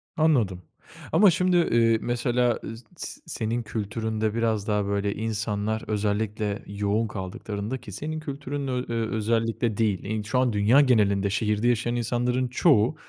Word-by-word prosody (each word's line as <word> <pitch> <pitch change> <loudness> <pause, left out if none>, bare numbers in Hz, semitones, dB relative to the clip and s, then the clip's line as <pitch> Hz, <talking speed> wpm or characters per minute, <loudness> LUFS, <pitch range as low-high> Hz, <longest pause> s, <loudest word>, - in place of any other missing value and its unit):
Anladım. 120 - +2 0.5
Ama 205 -4 +6
şimdi, 180 +1 +2
ııı, 115 -8 +3
mesela, 120 0 +1
ııı, 115 - -6
s 120 - -14
s, - - -6
senin 115 +2 -2
kültüründe 110 0 -2
biraz 110 -2 0
daha 105 -1 +1
böyle 100 0 -1
insanlar 110 0 -2
özellikle 105 0 -1
yoğun 105 +2 0
kaldıklarında 100 +4 -5
ki 105 - -11
senin 155 +10 -4
kültürünün 140 -2 -5 0.2
ö 115 -1 -1
özellikle 115 0 0
değil, 105 0 -1
şu 110 +5 0
an 125 -3 +2
dünya 110 +8 +5
genelinde 100 -6 +3
şehirde 105 +2 0
yaşayan 120 0 +1
insanların 125 +2 0
çoğu, 125 -1 +3
110 Hz, 140 wpm, -26 LUFS, 105-120 Hz, 0.5 s, Ama